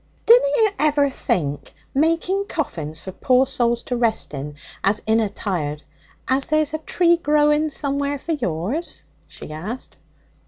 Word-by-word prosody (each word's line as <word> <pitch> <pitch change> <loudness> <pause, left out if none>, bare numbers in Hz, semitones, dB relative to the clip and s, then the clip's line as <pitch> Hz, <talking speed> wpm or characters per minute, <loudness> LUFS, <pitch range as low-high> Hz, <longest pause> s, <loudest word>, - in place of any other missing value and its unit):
'Dunna - - +7
you 440 -4 +3
ever 290 -2 +3
think, 145 - -2 0.2
making 330 +7 +1
coffins 160 - -3
for 190 - -7
poor 255 +6 +3
souls 240 -3 0
to 250 - -3
rest 230 -8 0
in 145 +1 -6 0.3
as 205 +2 +2
inna 220 -1 +2
tired, 150 -7 -3 0.4
as 265 +1 +1
there's 310 -1 +1
a 315 - -1
tree 340 +2 +3
growing 300 -1 +2
somewhere 280 0 -1
for 330 - -5
yours?' 240 - -3 0.2
she - - -10
asked. 195 +12 -7
270 Hz, 145 wpm, -22 LUFS, 195-310 Hz, 0.4 s, Dunna